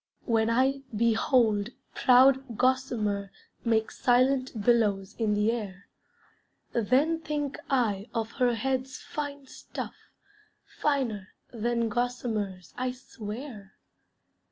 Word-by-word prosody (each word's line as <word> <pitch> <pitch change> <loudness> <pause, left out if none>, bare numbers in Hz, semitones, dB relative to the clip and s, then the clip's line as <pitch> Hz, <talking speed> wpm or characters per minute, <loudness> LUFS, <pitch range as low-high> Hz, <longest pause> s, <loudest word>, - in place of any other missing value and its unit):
When 225 -2 +2
I 265 +3 +2
behold 225 -1 +3 0.2
proud 260 -1 +4
gossamer 225 -6 0 0.3
Make 225 -2 +1
silent 255 0 +2
billows 205 -3 +2
in 215 -2 +2
the 210 +2 +2
air, 200 -5 -6 0.8
Then 265 +9 +2
think 295 -3 -3
I 225 -6 +1
of 225 -1 -2
her 250 -2 +1
head's 265 +1 -2
fine 285 -2 -6
stuff, - - -7 0.7
Finer 240 -10 -2 0.2
than 235 0 0
gossamer's, 220 -6 -2
I 255 0 -2
swear. 220 -3 -8
235 Hz, 100 wpm, -28 LUFS, 210-260 Hz, 0.8 s, proud